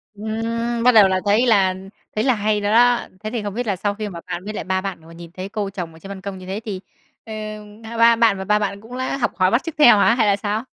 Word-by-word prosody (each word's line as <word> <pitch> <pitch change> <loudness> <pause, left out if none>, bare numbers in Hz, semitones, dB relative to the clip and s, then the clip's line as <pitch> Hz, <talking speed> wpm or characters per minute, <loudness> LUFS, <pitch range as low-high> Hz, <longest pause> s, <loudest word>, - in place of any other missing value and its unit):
Ừm, 230 +2 -3
bắt 250 - +6
đầu 215 -4 +7
là 185 -1 0
thấy 210 +5 +3
là 195 -5 +3 0.4
thấy 215 - 0
là 260 - +3
hay 210 0 0
rồi 205 0 0
đó. 240 +2 +5 0.2
Thế 215 - -3
thì 230 -3 -3
không 205 -1 -4
biết 245 +2 -3
là 200 - 0
sau 205 +2 -2
khi 215 0 -5
mà 170 -3 -8
bạn 175 - -5
với 215 - -5
lại - - -4
ba 190 0 -1
bạn 190 -3 -5
vừa 165 - -14
nhìn 170 0 -11
thấy 185 +2 -7
cô 205 -1 -3
trồng 180 -4 -6
ở 160 - -15
trên 195 - -11
băn 195 -1 -7
công 195 -1 -6
như 185 - -11
thế 190 +3 -4
thì, 195 -4 -5 0.4
ờm, 215 -1 -8
ba 230 +1 -8
ba 230 0 +6
bạn 225 -3 +3
và 190 - -5
ba 210 +2 +2
bạn 200 -1 -3
cũng 240 +3 -9
đã 260 +1 -2
học 250 - 0
hỏi 185 -1 +2
bắt 235 - +2
chước 330 -2 -6
theo 240 -8 +7
hả, 215 - +4
hay 225 -4 +2
là 200 - +4
sao? 210 +2 -3
210 Hz, 300 wpm, -21 LUFS, 195-230 Hz, 0.4 s, đầu